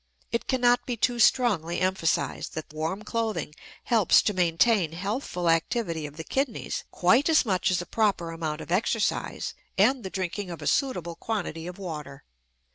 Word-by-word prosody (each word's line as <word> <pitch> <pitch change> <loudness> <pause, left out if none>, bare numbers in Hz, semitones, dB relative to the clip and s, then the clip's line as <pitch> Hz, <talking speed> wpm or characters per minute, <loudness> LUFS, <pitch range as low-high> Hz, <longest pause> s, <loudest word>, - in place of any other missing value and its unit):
It 235 - -1
cannot 245 -1 +3
be 245 -2 -2
too 240 +2 +1
strongly 205 -9 +3
emphasized 185 -3 0
that 155 -1 -6
warm 160 +7 -3
clothing 225 -9 -2 0.3
helps 225 -6 +4
to 210 - +1
maintain 180 0 +2
healthful 190 -1 -3
activity 165 -1 0
of 145 +1 -13
the 160 - -5
kidneys 265 - -2
quite 235 - +3
as 315 -4 +4
much 185 -5 +1
as 180 -1 +1
a - - -12
proper 195 -5 0
amount 160 -2 -4
of - - -9
exercise 210 +3 0 0.2
and 245 +7 +4
the 190 - -4
drinking 185 +1 -3
of 170 -3 -6
a 145 - -7
suitable 180 - 0
quantity 175 -5 -4
of 180 - -7
water. 150 -7 -7
185 Hz, 165 wpm, -27 LUFS, 165-230 Hz, 0.3 s, helps